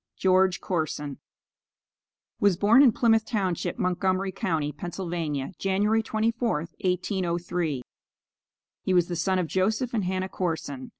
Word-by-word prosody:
GEORGE 185 -1 +3
CORSON 150 -5 -3 1.2
Was 200 -4 +3
born 215 +7 +6
in 270 -4 +7
Plymouth 225 0 +3
township, 195 -6 -2
Montgomery 185 +1 0
county, 160 -5 -1
Pennsylvania, 165 -2 -4
January 205 +3 +2
24th, 220 -6 -1
1803. 175 - -1 1.0
He 185 - 0
was 175 -1 +3
the 175 - -2
son 185 +3 +1
of 180 - +1
Joseph 215 +8 0
and 210 -5 0
Hannah 185 +1 -1
Corson. 160 -8 -4
185 Hz, 120 wpm, -26 LUFS, 170-205 Hz, 1.2 s, in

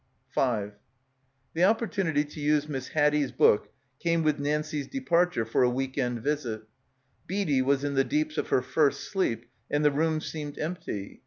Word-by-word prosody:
5 105 -5 -1 0.7
The 165 - +1
opportunity 195 -7 +2
to 150 +1 -11
use 150 0 +2
Miss 135 -3 -4
Haddie's 150 -2 +2
book 105 - +3 0.3
came 170 -1 +1
with 155 -2 +1
Nancie's 150 0 -1
departure 175 - +1
for 115 - +1
a 125 - +5
week 130 +1 -2
end 125 -4 -1
visit. 130 -7 -2 0.7
Readie 180 -9 +1
was 140 +1 +1
in 145 0 -1
the 135 0 +3
deeps 305 - -1
of - - -2
her 125 - +2
first 140 +2 +1
sleep 120 - -1 0.2
and 145 +1 +1
the 150 - +6
room 155 +2 +1
seemed 150 -2 -6
empty. 155 - -5
150 Hz, 165 wpm, -28 LUFS, 130-160 Hz, 0.7 s, the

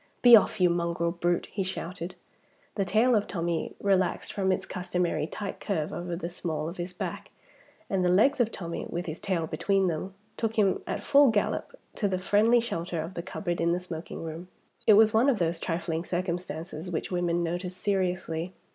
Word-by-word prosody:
"Be 240 -1 +11
off, 215 -1 +3
you 180 -1 +5
mongrel 170 0 0
brute!" 175 0 0
he 200 - -2
shouted. 185 -1 -5 0.6
The 195 - 0
tail 220 +7 +3
of 210 - +1
Tommie 170 -2 -2
relaxed 190 -3 +1
from 190 -2 +1
its 185 - -1
customary 180 -3 -1
tight 200 +2 -5
curve 160 -7 -2
over 175 0 -4
the 170 0 -4
small 165 -3 -3
of 170 - -6
his 175 +1 -4
back; 180 - -5 0.6
and 190 -2 0
the 180 - +3
legs 220 +11 +4
of 230 -2 +2
Tommie 170 -2 -5
(with 175 +1 -3
his 155 -1 -5
tail 180 -4 -1
between 195 +5 +1
them) 180 +4 -4 0.2
took 225 -1 -1
him 200 -3 +3
at - - -3
full 280 -1 +6
gallop 220 - -1 0.2
to 205 - +1
the 190 -1 0
friendly 210 +6 +4
shelter 170 -7 -3
of 165 +4 -4
the 170 - -4
cupboard 175 -1 -3
in 170 0 +2
the 175 - 0
smoking 170 -2 -7
room. 165 +2 -6 0.4
It 215 - +9
was 215 +1 +6
one 235 +5 +4
of 255 - +2
those 170 -2 0
trifling 165 -1 -2
circumstances 175 -1 -4
which 170 +1 -3
women 175 -1 +1
notice 175 +2 -3
seriously. 180 -3 -1
180 Hz, 190 wpm, -28 LUFS, 170-200 Hz, 0.6 s, Be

